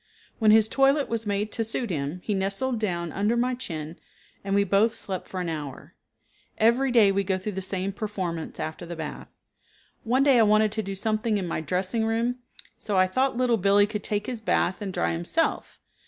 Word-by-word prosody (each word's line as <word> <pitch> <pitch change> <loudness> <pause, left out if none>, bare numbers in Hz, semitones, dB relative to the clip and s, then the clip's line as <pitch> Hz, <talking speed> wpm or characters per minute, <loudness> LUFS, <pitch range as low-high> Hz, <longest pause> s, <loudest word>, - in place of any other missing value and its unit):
When 220 -2 +4
his 220 0 +6
toilet 275 +3 +2
was 225 -1 -3
made 205 +1 -1
to 225 - -1
suit 225 0 -3
him 150 +2 -3
he 210 - -1
nestled 200 +6 -1
down 170 -6 -2
under 210 +4 0
my 250 +2 +1
chin, 160 -9 -6 0.4
and 195 0 -1
we 200 - +4
both 200 +4 +2
slept 190 -2 -5
for 185 - -5
an 180 - -3
hour. 150 -5 -6 0.6
Every 235 +5 +3
day 225 -5 +5
we 200 0 +1
go 190 -1 0
through 190 +3 -4
the 190 -1 -4
same 190 +1 -2
performance 190 -6 -4
after 155 +1 -5
the 170 0 -6
bath. 160 -2 -6 0.8
One 250 +4 +2
day 275 -4 +5
I - - +7
wanted 215 0 +4
to 220 - -2
do 195 -1 -5
something 215 +1 0
in 190 -3 -3
my 165 - -2
dressing 185 +7 -1
room, 230 +3 0 0.4
so 190 -3 +2
thought 255 +7 0
Little 245 -2 +2
Billee 200 +1 +4
could 210 0 -4
take 205 0 -2
his 245 -3 -5
bath 205 -3 0
and 200 -2 -3
dry - - 0
himself. 175 - -1
205 Hz, 200 wpm, -26 LUFS, 185-230 Hz, 0.8 s, I